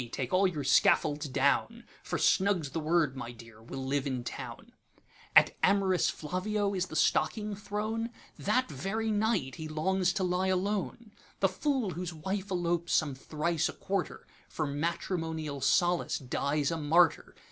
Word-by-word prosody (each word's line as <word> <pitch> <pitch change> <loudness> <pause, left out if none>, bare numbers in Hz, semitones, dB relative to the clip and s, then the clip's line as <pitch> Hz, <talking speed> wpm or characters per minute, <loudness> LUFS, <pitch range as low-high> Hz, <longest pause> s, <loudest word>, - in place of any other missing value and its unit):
take 130 -2 -3
all 190 +1 +5
your 155 -6 -3
scaffolds 145 +2 +3
down, 140 - +1 0.2
For - - -3
snug's 185 -7 +2
the 165 - -2
word: 155 -3 +1
My 120 -3 -6
dear! 115 -2 -14
we 120 +4 -8
'll 135 - -4
live 140 +1 0
in 130 -3 -2
town.'At - - -1
am'rous 190 -2 +3
Flavio 200 +5 -2
is 185 -1 -1
the - - -8
stocking 210 +7 +1
thrown? 215 +3 -3 0.3
That 250 +6 +1
very 195 +10 -2
night 205 - 0
he 160 - -5
longs 180 +4 +1
to 190 - -1
lie 180 +1 +1
alone. 200 +4 -1 0.3
The 195 - +3
fool 255 +1 -1
whose 175 0 -5
wife 190 +5 -3
elopes 175 -2 -1
some 150 -3 +2
thrice 155 +4 -1
a - - -6
quarter, 195 0 -3 0.2
For 155 - -2
matrimonial 160 0 -3
solace 175 +5 +2
dies 140 +2 -1
a 165 - -1
martyr. 160 +2 +3
175 Hz, 155 wpm, -30 LUFS, 150-195 Hz, 0.3 s, all